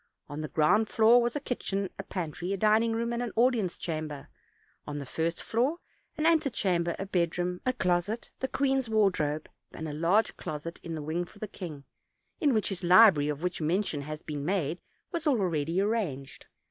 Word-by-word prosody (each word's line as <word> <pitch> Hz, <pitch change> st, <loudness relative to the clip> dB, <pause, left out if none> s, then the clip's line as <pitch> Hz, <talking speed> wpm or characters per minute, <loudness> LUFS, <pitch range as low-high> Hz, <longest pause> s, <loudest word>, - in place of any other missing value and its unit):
On 145 Hz, +1 st, -6 dB
the 155 Hz, -, -3 dB
ground 165 Hz, +10 st, +3 dB
floor 230 Hz, +2 st, +6 dB
was 240 Hz, 0 st, -1 dB
a -, -, 0 dB
kitchen, 200 Hz, -7 st, -2 dB
a -, -, -3 dB
pantry, 180 Hz, -1 st, -4 dB
a -, -, -1 dB
dining 220 Hz, +3 st, +3 dB
room, 235 Hz, +1 st, -1 dB
and 235 Hz, -, -2 dB
an 240 Hz, -3 st, -3 dB
audi 245 Hz, 0 st, +4 dB
ence 185 Hz, -4 st, -2 dB
chamber; 155 Hz, -4 st, -5 dB, 0.6 s
on 145 Hz, -, -4 dB
the 140 Hz, -, -5 dB
first 165 Hz, +6 st, -2 dB
floor 255 Hz, +9 st, +1 dB, 0.4 s
an 305 Hz, -, 0 dB
antechamber, 200 Hz, -, +2 dB
a 195 Hz, -, -4 dB
bed 175 Hz, -3 st, 0 dB
room, 180 Hz, 0 st, -2 dB
a 255 Hz, -, +3 dB
closet, 190 Hz, +1 st, -1 dB
the 265 Hz, -, -1 dB
queen's 270 Hz, -3 st, 0 dB
wardrobe, 180 Hz, -9 st, +1 dB, 0.3 s
and 160 Hz, -, -5 dB
a 150 Hz, -, -5 dB
large 170 Hz, +8 st, +2 dB
closet 155 Hz, +2 st, -6 dB
in 165 Hz, -1 st, -5 dB
a 150 Hz, -, -5 dB
wing 160 Hz, +4 st, -1 dB
for 190 Hz, -, -18 dB
the 215 Hz, -, -5 dB
king, 160 Hz, -8 st, -8 dB, 0.6 s
in 300 Hz, -6 st, +3 dB
which 215 Hz, -5 st, +1 dB
his 195 Hz, -2 st, -4 dB
library, 180 Hz, -4 st, +7 dB
of 150 Hz, +2 st, -4 dB
which 180 Hz, -2 st, -2 dB
mention 165 Hz, -1 st, 0 dB
has 155 Hz, +2 st, -7 dB
been 145 Hz, -2 st, -5 dB
made, 175 Hz, -1 st, -1 dB, 0.3 s
was 340 Hz, -3 st, -2 dB
already 175 Hz, -, +1 dB
arranged. 195 Hz, -, -2 dB
180 Hz, 195 wpm, -29 LUFS, 155-225 Hz, 0.6 s, library